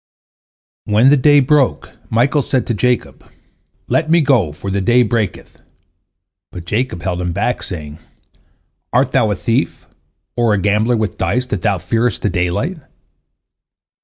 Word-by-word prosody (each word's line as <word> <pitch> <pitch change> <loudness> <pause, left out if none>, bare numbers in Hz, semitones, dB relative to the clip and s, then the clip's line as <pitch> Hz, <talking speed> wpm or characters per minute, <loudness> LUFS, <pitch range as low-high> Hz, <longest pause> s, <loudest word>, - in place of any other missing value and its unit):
When 110 +5 +4
the - - +6
day 145 +1 +5
broke, 140 0 +1 0.2
Michael 130 +6 +2
said 130 -1 -1
to 115 - -2
Jacob, 125 +3 -1 0.6
"Let 155 - 0
me 170 +1 +5
go, 125 - +2
for 95 +6 -6
the 100 0 -1
day 120 +5 +4
breaketh," 110 -3 -3 0.9
but 85 -2 -9
Jacob 105 -2 -2
held 90 -1 -2
him 90 -1 -2
back, 105 +6 -1
saying, 75 -4 -7 0.9
"Art - - +2
thou - - +2
a - - 0
thief, - - -2 0.5
or 115 -3 +2
a - - 0
gambler 105 +5 +1
with 110 -1 -3
dice, 125 +1 0
that 105 -7 -4
thou 100 -3 +1
fearest 115 +3 -1
the 105 - +1
daylight?" 90 - -2
115 Hz, 150 wpm, -17 LUFS, 95-125 Hz, 0.9 s, the